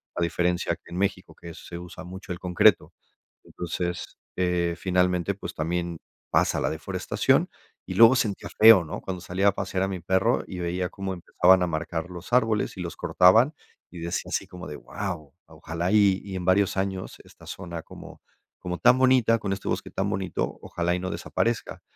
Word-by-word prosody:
A - - -2
diferencia 90 +1 0
que - - -19
en 90 - -5
México, 95 -1 -2
que 85 -1 -9
se 85 - -9
usa 90 +1 -9
mucho 95 +1 -9
el 85 - -4
concreto. 90 -2 +3 0.5
Entonces, 90 0 -5 0.2
eh, 90 -2 0
finalmente, 90 0 +1
pues, - - -7
también 85 +1 -2 0.3
pasa - - +2
la - - 0
deforestación 90 +4 0 0.4
y - - -5
luego 115 +3 +8
sentía 110 -6 -1
feo, 110 -5 +9
¿no?, 100 +7 -6
cuando 90 -2 -5
salía 95 +3 +1
a - - -1
pasear 95 -1 -2
a - - +1
mi 95 -2 -4
perro 95 +7 +1
y 95 - -7
veía 90 +1 -2
cómo 95 0 -5
empezaban 90 +1 +3
a 90 - +1
marcar 80 +1 -3
los 90 +6 -10
árboles 110 -4 +2
y 90 - -5
los 85 - -5
cortaban, 110 - +4 0.4
y 90 - -9
decía 85 +1 -3
así - - -2
como 90 0 -10
de: 75 - -7
"Guau, 85 -8 -6
ojalá 85 +3 -4
y 100 -3 +4
y 95 -2 -7
en 90 - -4
varios 95 +1 +3
años 95 -1 -3
esta - - -18
zona 85 -3 -7
como - - -12 0.4
como 90 -1 -5
tan 125 +9 +5
bonita 130 -3 +4
con 100 -2 -2
este 95 - -6
bosque - - -3
tan 100 +1 -1
bonito, 95 -3 -3
ojalá 85 0 -2
y - - -3
no 95 0 -4
desaparezca". 115 -1 -2
90 Hz, 190 wpm, -26 LUFS, 85-100 Hz, 0.5 s, feo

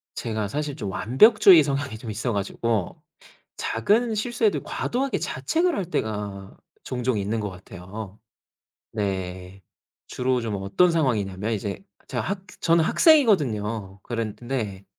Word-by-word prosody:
제가 110 -2 -2
사실 145 +5 -3
좀 105 -9 -4
완벽주의 175 - +6
성향이 140 -4 -2
좀 110 0 -7
있어 115 +3 -2
가지고 105 +1 -2 0.6
작은 220 - +1
실수해도 225 0 0
과도하게 265 +2 -2
자책을 345 +1 0
할 195 - -2
때가 105 - -4 0.3
종종 125 -2 -1
있는 105 +3 -1
것 105 -1 -3
같아요. 95 +2 -9 0.7
네. 95 -2 -4 0.5
주로 125 0 0
좀 110 -3 -3
어떤 170 - +3
상황이냐면 110 - 0
이제 100 - -4 0.2
제가 - - -2
학 195 -1 -4 0.2
저는 165 -1 +4
학생이거든요. 115 - +3
그런데 115 -3 -4
115 Hz, 275 characters per minute, -24 LUFS, 100-165 Hz, 0.7 s, 완벽주의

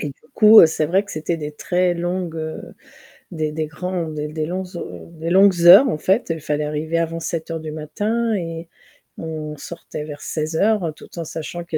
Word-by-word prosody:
et 150 - -3
du - - -19
coup, 215 -2 +9
c'est 155 -1 -1
vrai 190 +5 +2
que 200 - -13
c'était 155 +2 -2
des 150 -1 -6
très 180 +3 0
longues, 175 -1 -3
heu, 160 0 -5 0.7
des 155 -3 -2
des 155 +1 -2
grands 175 +2 -4
des 150 -1 -4
des 155 0 -3
longues 185 +3 -4
ho - - -8
des 165 +1 -5
longues 190 -1 +5
heures, 195 +10 +9
en 155 - -1
fait. 195 +9 +1
Il 165 -1 -2
fallait 150 0 -1
arriver 155 +2 -2
avant 165 0 -2
07:00 165 0 -4
du 155 -1 -6
matin 215 +9 -2
et 165 -2 -5 0.5
on 155 -2 -6
sortait 150 +1 -8
vers 145 -1 -9
16:00 165 +3 0
tout 170 - -12
en 165 - -4
sachant 165 +2 -6
qu'il 165 -2 -3
165 Hz, 200 wpm, -21 LUFS, 155-180 Hz, 0.7 s, coup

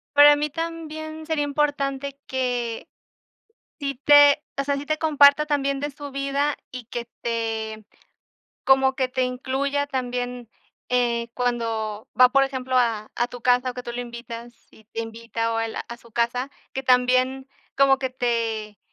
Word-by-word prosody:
Para 290 0 +9
mí 295 +1 -1
también 315 0 -6
sería 310 -2 0
importante 280 -1 -1
que 245 0 -2 0.9
si 280 -2 -2
te 290 +2 +6 0.2
o - - +2
sea, 280 0 0
si 280 - -6
te 310 +1 -1
comparta 300 -1 +5
también 280 -2 0
de 290 +1 -2
su 285 0 -9
vida 275 +1 0 0.2
y 255 -2 -7
que 240 0 -5 0.2
te, 225 -2 -2 0.8
como 265 0 +4
que 260 -1 0
te 255 0 -1
incluya 270 +3 -1
también, 245 -3 -4 0.4
eh, 235 -2 +1
cuando 225 -3 -2
va, 250 - +9
por 275 +2 +4
ejemplo, 260 -1 -2
a 225 -4 +1
a 240 - +1
tu 245 0 -9
casa 250 +1 +3
o - - -10
que 250 - -6
tú 240 - -6
lo 245 - -4
invitas 235 0 -8 0.2
y 220 - -20
te 225 +1 -6
invita 230 0 -3
o - - 0
al 225 0 -2
a 235 - -6
su 235 -1 -20
casa. 240 +3 0 0.2
Que 265 - -2
también 255 +1 +2 0.3
como 275 -1 +5
que 260 -1 -2
te 230 -4 -2
255 Hz, 165 wpm, -24 LUFS, 235-280 Hz, 0.9 s, Para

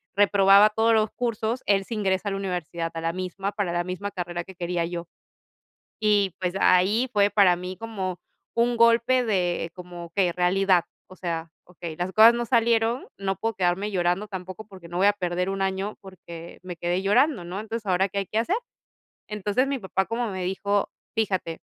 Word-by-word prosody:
reprobaba 200 0 +6
todos 225 +1 +2
los 215 -1 +3
cursos. 235 0 -2
Él 195 -1 +2
sí 230 - -5
ingresa 195 -1 0
a - - -4
la 195 - -2
universidad, 175 -3 -3
a 165 - -5
la 165 0 -1
misma, 185 +2 -4
para 200 -4 -1
la 175 - 0
misma 185 +3 -5
carrera 175 -2 -4
que 190 - -12
quería 175 -1 -2
yo. 170 0 -5 0.9
Y 205 -4 +2
pues, 180 0 -1
ahí 205 +8 +4
fue 205 -1 +3
para 195 -4 +5
mí 180 +1 -6
como 195 -5 -4 0.4
un 235 +1 +2
golpe 235 +2 +4
de 180 -6 0
como, 175 -1 -9
okey, 175 +1 0
realidad. 180 0 +2 0.2
O 185 - -12
sea, 165 -3 -4
okey, 170 -2 -8
las 180 +2 -2
cosas 225 +3 +8
no 240 0 -2
salieron, 230 0 +2
no 195 -1 -2
puedo 225 +3 -2
quedarme 185 +3 0
llorando 180 +2 0
tampoco, 190 +2 -7
porque 190 -4 -13
no 175 - -6
voy 190 +2 +3
a 205 - +6
perder 180 -2 -2
un 195 0 -2
año, 195 +2 -2
porque 170 -3 -11
me 180 -1 -6
quedé 175 +2 -1
llorando, 240 - +2
¿no? 180 +3 -5
Entonces, 220 0 -5
¿ahora 190 +1 +2
qué 200 +1 -4
hay 195 - -2
que 215 - -2
hacer? 240 - +1 0.7
Entonces 210 +5 0
mi 275 0 -1
papá 190 -3 -1
como 230 +1 -2
me 185 -1 -4
dijo: 200 +2 0 0.3
"Fíjate, 190 -6 -1
195 Hz, 195 wpm, -25 LUFS, 180-215 Hz, 0.9 s, cosas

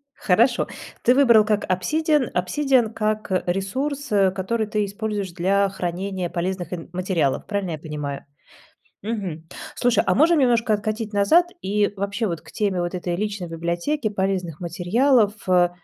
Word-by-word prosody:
Хорошо. 230 +6 +2 0.4
Ты 250 - +5
выбрал 235 -6 +6
как 210 -1 0
"Obsidian" 300 - +1
"Obsidian" 245 +5 +2
как, 215 -2 -2
э, 185 - +1
ресурс, 265 +11 -2
э, 195 -2 +4
который 215 +4 -1
ты 210 -1 0
используешь 205 -2 -4
для 195 +3 +2
хранения 185 0 -3
полезных 175 0 -3
ин 165 -2 -7
материалов, 175 -7 0
правильно 200 -4 -2
я 155 - -3
понимаю? 150 -3 -5 0.8
Мгм. 190 -8 -4 0.3
Слушай, 245 -1 +2
а - - +3
можем 320 +3 +4
немножко 235 -4 +3
откатить 215 +1 -2
назад 205 - +4 0.2
и 205 +1 0
вообще 200 +2 -2
вот 170 -3 -4
к 160 - -15
теме 195 -4 0
вот 175 +1 -3
этой 175 -1 -2
личной 205 -2 -3
библиотеки 170 - -2
полезных 190 -5 -2
материалов, 205 - +2
э, 180 -1 +4
200 Hz, 150 wpm, -23 LUFS, 180-225 Hz, 0.8 s, выбрал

